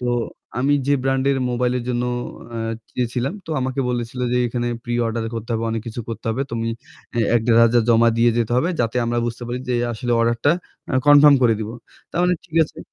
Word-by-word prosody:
তো 125 - -3 0.5
আমি 140 +3 +2
যে 145 - +4
ব্র্যান্ডের 135 +1 +1
মোবাইল 125 0 0
এর 120 - -6
জন্য 120 0 0 0.5
অ্যা 115 -1 -3 0.2
গিয়েছিলাম, 125 +2 -1
তো - - -7
আমাকে 130 +1 -2
বলেছিল 120 0 -3
যে, - - +2
"এখানে 120 0 -2 0.2
প্রি-অর্ডার 120 -1 -1
করতে 115 +1 -6
হবে, 115 0 -1
অনেক 115 -1 -2
কিছু 115 +1 -5
করতে 115 -1 -6
হবে। 125 +5 -1
তুমি 115 0 -2 0.5
এ - - +3 0.2
১-১,৫০০ 115 +1 +4
জমা 115 0 +5
দিয়ে 120 +1 +5
যেতে 120 0 0
হবে 155 +8 +2
যাতে 115 0 -1
আমরা 120 0 0
বুঝতে 120 +1 -5
পারি 120 +1 -2
যে 125 - +1 0.2
আসলে 120 +2 -2
অর্ডারটা 115 +4 +2 0.4
আ - - +1
কনফার্ম 145 0 +8
করে 115 -2 +5
দিব।" 110 - -4 0.4
তার - - -4
মানে 180 0 +3
ঠিক 165 -2 -8
আছে। 155 +1 -14
120 Hz, 200 wpm, -21 LUFS, 115-130 Hz, 0.5 s, কনফার্ম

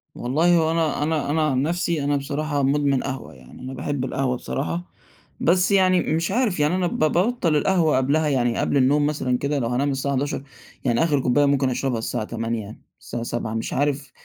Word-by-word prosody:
والله 160 +8 +2
هو 160 -1 +2
أنا 160 -3 0
أنا 155 -2 -1
أنا 160 +2 +1
عن 130 0 +1
نَفسي 170 -1 -1
أنا 145 +1 +1
بصراحة 145 +1 -2
مُدمن 140 -1 +1
قهوة، 130 -1 -5
يعني 65 - -15
أنا 130 +1 -6
باحِب 135 0 -3
القهوة 130 -1 -1
بصراحة، 80 - -3 0.6
بس 180 +4 +2
يعني 185 -2 +4
م - - -1
مش 165 +3 -1
عارف 225 -7 0
يعني 150 +4 +2
أنا 185 -1 +1
ب - - -4
بابطَّل 175 +2 +2
القهوة 160 -2 +2
قبلها 145 +4 +1
يعني 120 -4 +1
قبل - - +1
النوم 145 +3 +3
مثلًا 130 -4 0
كده 140 +1 -1
لو 115 - -1
هانام 135 +4 0
الساعة 140 +1 -1
23:00 140 0 -2 0.4
يعني 120 +3 +2
آخِر 150 -4 +2
كُوباية 135 +3 +2
ممكن 140 -2 +2
أشربها 125 -2 -1
الساعة 110 - -3
20:00، 115 -1 -4 0.2
الساعة 120 -1 -6
19:00 120 -2 -3
مش 115 0 -3
عارف 140 -1 -1
140 Hz, 200 wpm, -23 LUFS, 130-160 Hz, 0.6 s, يعني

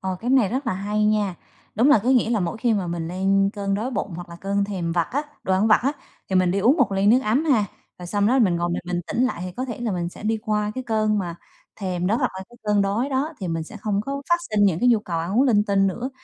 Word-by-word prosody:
Ờ, 190 -1 -3
cái 245 +2 -2
này 255 -7 +4
rất 260 +2 -3
là 230 - +1
hay 210 +2 -1
nha! 210 -3 +1 0.4
Đúng 235 +6 +3
là 290 - +7
có 245 - -1
nghĩa 245 -3 +3
là 220 -4 +1
mỗi 175 +5 -2
khi 235 0 +1
mà 190 -3 -1
mình 170 -1 -3
lên 195 +2 +1
cơn 200 -2 -2
đói 230 +6 -2
bụng 200 -6 -3
hoặc 175 +1 -8
là 170 - -10
cơn 200 +1 0
thèm 180 -5 -3
vặt 170 -2 0
á, 285 +2 0 0.2
đồ 190 - -1
ăn 190 +4 +3
vặt 215 - +5
á, 275 +3 +1 0.4
thì 190 - +1
mình 185 -1 +3
đi 195 - 0
uống 250 +10 +4
một 250 - +2
ly 195 +1 +1
nước 245 +5 +6
ấm 245 +9 +1
ha, 250 -9 +3 0.3
rồi 180 - -8
xong 205 +2 +1
đó 255 +5 +3
mình 185 -8 +3
ngồi 175 0 -1
mình 175 - -2
bình 180 -1 -1
tĩnh 245 - 0
lại 255 - -2
thì 185 - -6
có 255 - -2
thể 240 -2 -6
là 225 -4 -1
mình 175 -1 -2
sẽ 180 - -12
đi 220 +1 0
qua 210 -1 0
cái 260 -1 -5
cơn 215 -2 +1
mà 175 -3 -3 0.5
thèm 180 -2 -2
đó 215 +4 +2
hoặc - - 0
là 190 - -6
cái 240 - -17
cơn 210 -1 +2
đói 215 +7 0
đó 280 +4 -1
thì 185 - -3
mình 165 -1 -2
sẽ 215 +7 -10
không 205 -1 -1
có 275 +5 -4
phát 345 - +5
sinh 210 -1 +3
những 180 -5 +2
cái 250 - +4
nhu 235 -3 +5
cầu 170 -5 -3
ăn 180 +7 -1
uống 260 - +6
linh 210 -4 +3
tinh 195 -1 +2
nữa. 240 +8 -3
205 Hz, 305 wpm, -23 LUFS, 185-235 Hz, 0.5 s, là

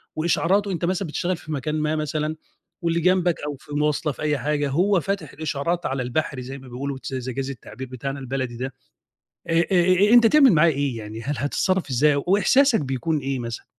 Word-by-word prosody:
وإشعاراته، 185 +5 +1
أنت 175 -1 -2
مثلًا 185 +1 -1
بتشتغل 175 +3 -2
في 155 - -10
مكان 150 +1 -2
ما 155 0 0
مثلًا، 155 0 -2 0.5
واللي 170 -1 +1
جنبك 180 0 +2
أو 145 - -3
في 145 - -11
مواصلة، 150 0 0
في - - -12
أي 150 -1 +1
حاجة، 145 +2 -1
هو 180 +7 +2
فاتح 195 -5 -3
الإشعارات 155 +3 -2
على 135 -1 -1
البحري 130 +1 -2
زي 130 +2 -7
ما 135 -1 -13
بيقولوا 135 +2 -4
تس 135 - -7
إذا 130 0 -3
جَازَ 135 +2 -3
التعبير 130 0 -8
بتاعنا 135 +2 -5
البلدي 130 -2 -4
ده. 130 +1 -4 0.8
آآ 165 - 0 0.2
آآ 185 +3 +4
أ - - +4
أنت 240 -1 +8
تعمل 275 0 +6
معاه 165 0 +5
إيه، 140 -4 -1
يعني 110 +1 -7
هل 145 +4 -2
هتتصرّف 185 +4 0
إزاي، 140 +2 +3
وإحساسك 225 +7 +4
بيكون 135 +3 -1
إيه 135 -1 -2
مثلًا؟ 115 -1 -6
150 Hz, 200 wpm, -23 LUFS, 135-175 Hz, 0.8 s, أنت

